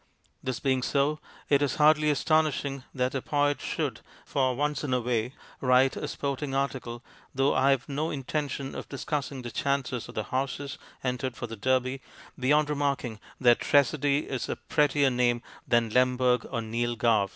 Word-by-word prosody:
This 130 Hz, -2 st, -3 dB
being 130 Hz, -2 st, +1 dB
so, 145 Hz, +3 st, +1 dB, 0.3 s
it 140 Hz, -1 st, +3 dB
is 145 Hz, -3 st, +1 dB
hardly 150 Hz, 0 st, +5 dB
astonishing 145 Hz, -2 st, +1 dB
that 125 Hz, 0 st, -1 dB
a 135 Hz, -, -1 dB
poet 145 Hz, +1 st, +1 dB
should, -, -, -2 dB, 0.2 s
for 130 Hz, -2 st, +1 dB
once 150 Hz, +3 st, -1 dB
in 130 Hz, -3 st, 0 dB
a -, -, +2 dB
way, 120 Hz, +2 st, -1 dB, 0.2 s
write 130 Hz, 0 st, +4 dB
a -, -, -4 dB
sporting 140 Hz, 0 st, -3 dB
article, 130 Hz, -3 st, -2 dB, 0.3 s
though 135 Hz, +1 st, +3 dB
I 135 Hz, +1 st, +3 dB
have 135 Hz, -1 st, +2 dB
no 150 Hz, +3 st, -2 dB
intention 140 Hz, -1 st, -3 dB
of -, -, -7 dB
discussing 140 Hz, -1 st, -3 dB
the 120 Hz, -, -6 dB
chances 135 Hz, -3 st, -1 dB
of -, -, -11 dB
the 110 Hz, -, -1 dB
horses 135 Hz, +4 st, -3 dB, 0.2 s
entered 125 Hz, 0 st, -2 dB
for -, -, -4 dB
the 115 Hz, -1 st, -7 dB
Derby, 130 Hz, +3 st, 0 dB, 0.4 s
beyond 150 Hz, +3 st, +3 dB
remarking 140 Hz, -6 st, -1 dB, 0.2 s
that 120 Hz, -2 st, +5 dB
Tressady 145 Hz, 0 st, +2 dB
is 130 Hz, -3 st, -3 dB
a -, -, -1 dB
pret 150 Hz, -1 st, +1 dB
tier 140 Hz, -1 st, +3 dB
name 120 Hz, -1 st, +1 dB, 0.2 s
than 115 Hz, -2 st, +2 dB
Lemberg 125 Hz, 0 st, +3 dB
or 115 Hz, -4 st, -2 dB
Neil 120 Hz, +2 st, -1 dB
Gow. 110 Hz, -4 st, +2 dB
135 Hz, 175 wpm, -28 LUFS, 125-145 Hz, 0.4 s, hardly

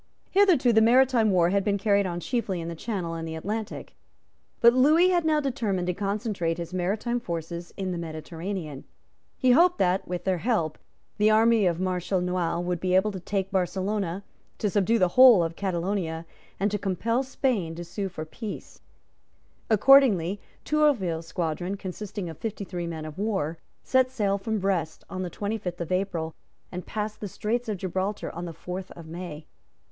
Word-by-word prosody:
Hitherto 360 Hz, -12 st, +4 dB
the 220 Hz, -, +5 dB
maritime 240 Hz, -1 st, +5 dB
war 175 Hz, -2 st, +3 dB
had 200 Hz, 0 st, +2 dB
been 200 Hz, 0 st, +1 dB
carried 200 Hz, -1 st, +2 dB
on 175 Hz, -1 st, -3 dB
chiefly 205 Hz, -3 st, -2 dB
in 165 Hz, 0 st, -4 dB
the 170 Hz, -, -5 dB
Channel 180 Hz, -3 st, -3 dB
and 165 Hz, 0 st, -4 dB
the 160 Hz, -, -5 dB
Atlantic. 210 Hz, +6 st, -5 dB, 0.6 s
But 235 Hz, 0 st, +7 dB
Lewis 310 Hz, +8 st, +5 dB
had 345 Hz, -2 st, +2 dB
now 310 Hz, -1 st, +3 dB
determined 225 Hz, -10 st, -1 dB
to 180 Hz, -, 0 dB
concentrate 200 Hz, -3 st, -2 dB
his 170 Hz, 0 st, -6 dB
maritime 210 Hz, +7 st, -1 dB
forces 170 Hz, -4 st, -5 dB
in 190 Hz, -2 st, -2 dB
the 175 Hz, -, -3 dB
Mediterranean. 160 Hz, -1 st, -5 dB, 0.5 s
He 255 Hz, -2 st, +4 dB
hoped 350 Hz, +7 st, +5 dB
that, 185 Hz, +1 st, +1 dB
with 180 Hz, 0 st, -4 dB
their 185 Hz, -2 st, 0 dB
help, 170 Hz, -8 st, 0 dB, 0.4 s
the 210 Hz, +1 st, +5 dB
army 220 Hz, -1 st, +4 dB
of 170 Hz, -1 st, 0 dB
Marshal 185 Hz, 0 st, 0 dB
Noailles 180 Hz, -1 st, -1 dB
would 175 Hz, -1 st, -1 dB
be 185 Hz, +1 st, +1 dB
able 200 Hz, +3 st, +3 dB
to 190 Hz, -, -6 dB
take 195 Hz, +2 st, -2 dB
Barcelona, 190 Hz, 0 st, -1 dB, 0.3 s
to 210 Hz, -, -1 dB
subdue 210 Hz, +3 st, +2 dB
the 185 Hz, -4 st, +3 dB
whole 245 Hz, -3 st, +8 dB
of 165 Hz, 0 st, -3 dB
Catalonia, 175 Hz, -3 st, -2 dB, 0.3 s
and 200 Hz, +2 st, +1 dB
to 210 Hz, -, -1 dB
compel 210 Hz, +6 st, 0 dB
Spain 250 Hz, -10 st, -1 dB
to 175 Hz, -, -6 dB
sue 195 Hz, +3 st, -4 dB
for 160 Hz, -3 st, -6 dB
peace. 210 Hz, +6 st, -8 dB, 0.9 s
Accordingly, 215 Hz, -6 st, +5 dB, 0.2 s
Tourville's 210 Hz, -, +1 dB
squadron, 175 Hz, +3 st, -2 dB
consisting 195 Hz, 0 st, -6 dB
of 160 Hz, -2 st, -8 dB
fifty 215 Hz, -2 st, -4 dB
three 175 Hz, -3 st, -5 dB
men 160 Hz, -2 st, -5 dB
of 155 Hz, +3 st, -8 dB
war, 190 Hz, -7 st, -1 dB, 0.2 s
set 260 Hz, -1 st, +3 dB
sail 205 Hz, -6 st, 0 dB
from 220 Hz, +2 st, -2 dB
Brest 185 Hz, -5 st, -1 dB
on 185 Hz, -, -4 dB
the 180 Hz, -, -3 dB
twenty 210 Hz, +5 st, -3 dB
fifth 180 Hz, -3 st, -5 dB
of 170 Hz, 0 st, -4 dB
April 175 Hz, -4 st, -1 dB, 0.4 s
and 180 Hz, 0 st, -6 dB
passed 215 Hz, 0 st, -4 dB
the 210 Hz, -, -4 dB
Straits 225 Hz, +5 st, -2 dB
of 210 Hz, -, -1 dB
Gibraltar 190 Hz, +3 st, -3 dB
on 170 Hz, +2 st, -5 dB
the 170 Hz, -, -6 dB
fourth 180 Hz, +3 st, -6 dB
of 170 Hz, -, -11 dB
May. 160 Hz, -2 st, -7 dB
190 Hz, 180 wpm, -26 LUFS, 175-220 Hz, 0.9 s, whole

